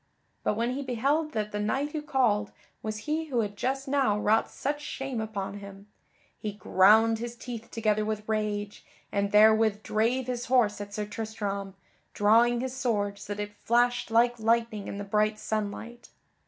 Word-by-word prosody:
But - - +1
when 235 +3 0
he 270 +2 -3
beheld 280 +5 0
that 210 -1 -2
the 210 - -3
knight 265 +8 -1
who 310 - -3
called 245 -8 +1 0.3
was 215 0 -4
he 315 +2 -1
who 255 -6 0
had 205 -1 -4
just 270 +5 -2
now 265 -7 +2
wrought 215 +1 +2
such 290 +2 -3
shame 270 -5 -4
upon 205 -2 -4
him, 200 0 -11 0.5
he 210 -1 -4
ground 215 +3 +4
his 240 +1 -5
teeth 235 -1 -8
together 215 -2 0
with 215 0 -3
rage, 210 -1 -2 0.3
and 200 0 0
therewith 215 0 +5
drave 235 +4 +1
his 245 -1 -3
horse 230 -5 +3
at 205 0 -7
Sir 210 +1 -3
Tristram, 205 -2 -4 0.4
drawing 235 +3 +4
his 260 0 -4
sword 205 -6 -1
so 205 0 -5
that 210 - -2
it 205 0 -9
flashed 240 +3 +1
like 235 +1 +3
lightning 225 -2 +1
in - - -5
the 205 - -4
bright 215 +1 +1
sunlight. 220 +3 -4
220 Hz, 175 wpm, -28 LUFS, 210-245 Hz, 0.5 s, therewith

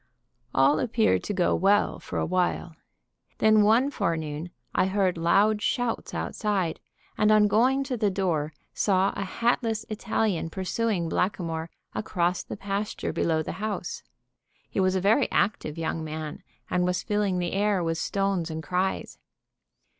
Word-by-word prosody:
All 140 +3 +4
appeared 225 -1 +2
to - - -2
go 180 -2 +2
well 200 +3 +2
for - - -6
a - - +1
while. 175 -2 -1 0.6
Then 215 -1 +5
one 230 +7 +4
forenoon 160 - -2 0.2
I - - +2
heard 190 -2 +1
loud 200 +6 +3
shouts 245 +2 -1
outside, 195 -6 -1 0.4
and 210 0 +4
on 210 -1 +6
going 255 +6 +3
to 260 -2 -3
the 210 -2 +2
door, 175 -6 -1 0.2
saw 195 -1 +2
a 200 - -2
hatless 225 +2 0
Italian 215 -5 -1
pursuing 190 0 -1
Blackamoor 165 -2 -1 0.2
across 180 -4 0
the - - -7
pasture 200 0 -3
below 160 -1 +1
the - - -4
house. 220 - -3 0.7
He - - -2
was 185 0 +2
a 190 - +1
very 220 +8 +3
active 195 -6 0
young 165 0 -2
man, 155 -1 -5 0.3
and 180 0 +1
was 180 0 0
filling 205 -3 0
the 175 -1 -2
air 200 -2 +1
with 165 0 -1
stones 195 -4 0
and 160 0 -5
cries. 185 +2 -2
190 Hz, 150 wpm, -26 LUFS, 170-215 Hz, 0.7 s, on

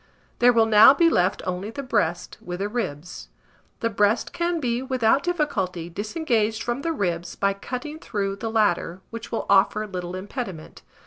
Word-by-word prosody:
There 245 +1 +6
will 230 -2 +4
now 220 +5 +8
be 335 +2 +4
left 180 - +1
only 185 +3 -3
the 280 +5 -6
breast, 180 -9 -1
with 175 0 -6
the 200 +2 -2
ribs. 180 -8 -5 0.5
The 230 - +1
breast 205 +2 +1
can 340 0 -1
be, 245 -3 -1
without 260 -1 +2
difficulty, 195 - -2
disengaged 220 - -1
from 240 +3 -2
the 330 - -1
ribs 175 - -2
by 200 0 +1
cutting 255 +9 -6
through 195 -6 -3
the 225 +3 -4
latter, 200 -5 0
which 230 0 -8
will 230 - -2
offer 200 +2 +3
little 180 -3 -5
impediment. 190 - -7
215 Hz, 170 wpm, -24 LUFS, 185-245 Hz, 0.5 s, now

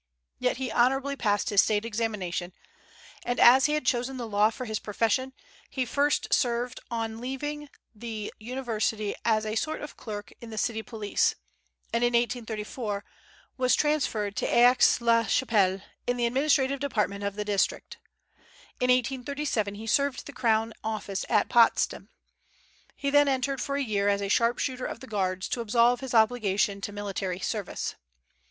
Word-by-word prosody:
Yet - - 0
he 260 -3 -3
honorably 270 +3 +2
passed 215 -1 0
his 200 -2 +6
State 210 0 0
examination; 205 -6 -3 0.7
and 245 0 -2
as 260 +2 +7
he 300 - -1
had 300 -3 -1
chosen 250 +2 0
the 240 -2 -4
law 210 0 +3
for 250 +3 -7
his 220 -2 -3
profession, 225 +5 0 0.4
he 260 -2 -2
first 285 +4 +1
served 240 0 0
on 225 -1 -3
leaving 295 +3 -4 0.2
the 220 -1 -6
university 220 -3 -2
as 220 -1 +2
a 215 - -2
sort 310 +8 -2
of 295 - -8
clerk 205 -3 -7
in 235 - -9
the 220 - -8
city 220 +1 -1
police, 215 -2 0 0.6
and 230 +1 +1
in 240 0 +2
1834 225 -3 -2 0.5
was 255 -1 +3
transferred 240 -9 0
to - - 0
Aix 245 0 +5
la 230 -1 +3
Chapelle, 195 -6 +2 0.3
in 245 0 0
the 240 - +1
administrative 270 +2 +2
department 210 -7 -1
of 200 -1 -2
the 210 0 -3
district. 205 -2 -1 0.8
In 250 - +1
1837 250 -3 0
he 215 +2 -8
served 280 +4 +1
in - - -18
the 285 - -9
crown 225 -3 +1
office 210 -3 -3
at - - +3
Potsdam. 235 -2 +3 0.9
He 280 - -2
then 290 0 +5
entered 270 0 0
for 280 - -2
a 280 - 0
year 205 -4 +1
as 200 0 +1
a 200 - -2
sharpshooter 245 +4 +1
of - - -6
the 265 - -10
Guards, 190 -5 -2
to 240 - -2
absolve 235 +2 +3
his 260 -2 -4
obligation 215 -3 +2
to 205 - -4
military 200 -3 -3
service. 205 0 -3
230 Hz, 165 wpm, -27 LUFS, 210-255 Hz, 0.9 s, as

